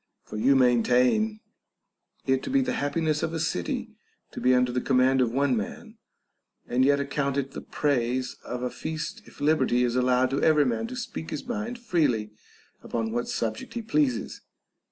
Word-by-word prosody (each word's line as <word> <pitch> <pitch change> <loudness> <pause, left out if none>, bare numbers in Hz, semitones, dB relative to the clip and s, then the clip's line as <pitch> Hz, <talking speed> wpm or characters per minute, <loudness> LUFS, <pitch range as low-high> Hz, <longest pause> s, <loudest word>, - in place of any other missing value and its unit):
For - - -10
you 130 +6 +4
maintain 125 - +3 0.8
it 130 -1 +2
to - - -5
be 275 0 +3
the 255 -1 -1
happiness 155 - 0
of 165 - -2
a - - -2
city 90 - -2 0.4
to - - -7
be 125 0 +4
under 125 0 +2
the 125 0 -1
command 130 0 +3
of 120 -2 +2
one 135 +1 +2
man, 105 - -6 0.7
and 125 +2 +2
yet 140 +1 +4
account 140 0 -1
it 135 -1 -2
the - - -7
praise 130 -3 -1
of 125 0 -5
a 125 - -2
feast 160 +8 -5
if - - -16
liberty 145 -4 +2
is 120 -1 0
allowed 125 +1 +2
every 150 -2 +5
man 125 - -1
to 255 - -7
speak 240 -10 -5
his - - -5
mind 240 0 -4
freely 145 - 0 0.5
upon 115 -1 -3
what 120 +1 -2
subject 110 - -3
he 235 - -3
pleases. 145 - 0
135 Hz, 175 wpm, -26 LUFS, 125-160 Hz, 0.8 s, every